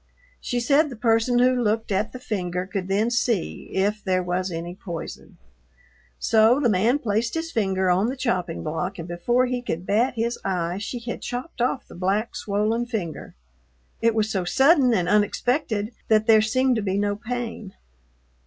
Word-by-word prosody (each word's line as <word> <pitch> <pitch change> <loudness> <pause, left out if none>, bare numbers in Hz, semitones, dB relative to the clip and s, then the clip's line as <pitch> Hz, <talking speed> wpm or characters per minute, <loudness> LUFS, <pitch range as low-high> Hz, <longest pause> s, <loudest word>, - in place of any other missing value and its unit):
She 245 - -2
said 285 +5 +3
the 255 - -7
person 230 +1 +2
who 250 +1 +5
looked 225 -3 0
at 200 +3 0
the - - -7
finger 180 -7 -3
could 190 -1 -4
then 210 +4 +1
see 235 -5 -1
if 205 +2 0
there 185 -2 +1
was 180 +1 -1
any 170 +1 -5
poison. 170 -3 -8 0.8
So 225 +4 +4
the 255 -5 +2
man 220 +8 +3
placed 230 -1 -1
his 325 0 -3
finger 190 - 0
on 190 +5 +2
the 255 - -2
chopping 180 - -2
block 180 +5 -3
and 170 -1 -6
before 240 +9 +1
he 250 -1 -2
could 175 -7 -4
bat 235 +7 +1
his 235 +1 -1
eye 180 -1 -1
she 220 +4 -4
had 235 0 -5
chopped 245 +2 -5
off 250 +2 0
the - - -13
black, 195 +5 -1
swollen 215 +4 -1
finger. 200 -10 -5 0.7
It 230 -1 +3
was 220 0 +1
so 190 -3 0
sudden 265 - +4
and 180 -7 +1
unexpected 210 +1 +1 0.2
that 215 -1 +3
there 220 -1 +6
seemed 255 +3 +2
to - - 0
be 195 -1 -1
no 205 0 0
pain. 230 -3 -5
215 Hz, 180 wpm, -24 LUFS, 190-245 Hz, 0.8 s, there